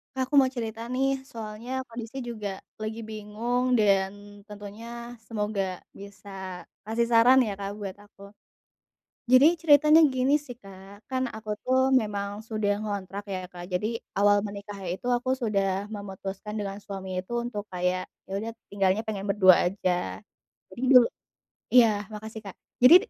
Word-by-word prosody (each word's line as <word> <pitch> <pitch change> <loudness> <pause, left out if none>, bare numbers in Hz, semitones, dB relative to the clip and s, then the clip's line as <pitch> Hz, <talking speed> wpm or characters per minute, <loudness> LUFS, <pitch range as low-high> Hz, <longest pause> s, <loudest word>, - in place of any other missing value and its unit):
Kak, 260 -1 -1
aku 295 - 0
mau 260 -2 +6
cerita 225 0 -4
nih 265 +1 +2 0.2
soalnya 230 +2 -5
kondisi 235 +2 -7
juga 205 -4 -5 0.2
lagi 215 +1 -4
bingung 230 +4 -1
dan 205 -1 +1
tentunya 230 +4 -9
semoga 210 -2 -1 0.4
bisa 200 0 -11 0.6
kasih 230 +2 0
saran 240 +3 +6
ya, 210 -5 -1
Kak, 200 0 -4
buat 195 -1 -5
aku. 205 - -22 1.1
Jadi 255 +2 +8 0.2
ceritanya 305 0 +7
gini 260 +2 +2
sih, 245 - -7
Kak, 195 +1 -14
kan 260 -1 0
aku 215 0 -9 0.2
tuh 260 +1 +3 0.2
memang 200 -2 -3 0.2
sudah 215 -2 0
ngontrak 200 -1 -4
ya, 185 - -2
Kak, 175 -1 -8
jadi 180 +4 +1 0.3
awal 205 +1 +5
menikah 200 0 -7 0.2
itu 190 - -9
aku 250 +1 -4
sudah 205 -4 +1 0.3
memutuskan 195 0 -6
dengan 200 -1 -4
suami 195 -2 -6
itu 185 +5 -5
untuk 210 -4 -4
kayak 180 0 0 0.2
ya - - -9
udah 220 +3 -4 0.2
tinggalnya 195 +1 +2
pengen 200 -3 -4
berdua 190 -3 +7
aja, 180 0 -1 0.5
jadi 245 - -9
dulu 250 -2 +9 0.7
iya 245 -2 +8 0.3
makasih, 220 +1 -7
Kak, 195 - -8 0.3
jadi, 255 +8 +10
210 Hz, 150 wpm, -27 LUFS, 200-235 Hz, 1.1 s, jadi